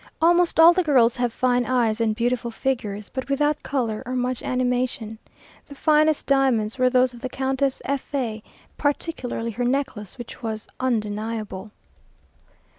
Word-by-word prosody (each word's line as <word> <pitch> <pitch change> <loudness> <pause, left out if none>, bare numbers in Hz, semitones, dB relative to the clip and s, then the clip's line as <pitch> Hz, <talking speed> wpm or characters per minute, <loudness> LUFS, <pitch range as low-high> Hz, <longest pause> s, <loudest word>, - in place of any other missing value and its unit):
Almost 345 +1 +3
all 330 +2 +9
the 370 - +2
girls 255 -8 +4
have 245 -1 0
fine 245 +1 +1
eyes 235 -3 +1
and 220 -2 +1
beautiful 240 +1 -1
figures, 220 -5 -3
but 260 +1 -6
without 295 +2 +1
colour, 235 -6 -2
or 255 +1 -4
much 250 0 -1
animation. 250 -3 -1 0.5
The 285 - -11
finest 310 +1 +3
diamonds 265 -4 +2
were 255 0 +4
those 255 0 +3
of 240 - -12
the 255 - -4
Countess 265 +1 -1
F 280 -1 -3
a, 225 -5 -2 0.4
particularly 275 -5 -2
her 240 +3 -3
necklace, 245 -6 -2
which 240 0 -9
was 220 -2 -4
undeniable. 215 -4 -2
250 Hz, 150 wpm, -23 LUFS, 230-270 Hz, 0.5 s, all